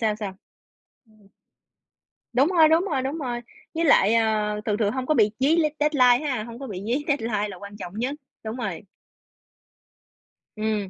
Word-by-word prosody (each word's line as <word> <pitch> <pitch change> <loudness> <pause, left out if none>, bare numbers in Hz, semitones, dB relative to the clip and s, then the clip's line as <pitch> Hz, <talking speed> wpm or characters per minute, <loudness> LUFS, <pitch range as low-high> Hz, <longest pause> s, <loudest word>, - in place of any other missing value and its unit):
sao, 215 -2 +1
sao? 205 -3 -5 0.8
Ừm. 210 -2 -24 1.1
Đúng 265 +4 +4
rồi, 335 -3 +5
đúng 325 +2 +4
rồi, 305 -9 -1
đúng 270 +5 -3
rồi. 245 -5 -3 0.3
Với 335 +1 +1
lại, 225 -7 +5
à, 215 -2 +1
thường 210 -2 0
thường 210 -2 +1
hông 260 +2 -3
có 310 - +2
bị 215 -6 +3
dí 285 +5 +3
lét 310 -3 +2
deadline 290 -2 +4
ha, 250 -6 -1
hông 235 +1 -9
có 270 - -6
bị 190 -3 -6
dí 255 +6 -1
deadline 225 -8 0
là 190 - -8
quan 200 +2 -10
trọng 180 -3 -8
nhất 260 +4 -1 0.3
đúng 220 +1 -4
rồi. 195 -9 -4 1.7
Ừm. 215 -2 -2
235 Hz, 180 wpm, -24 LUFS, 210-280 Hz, 1.7 s, rồi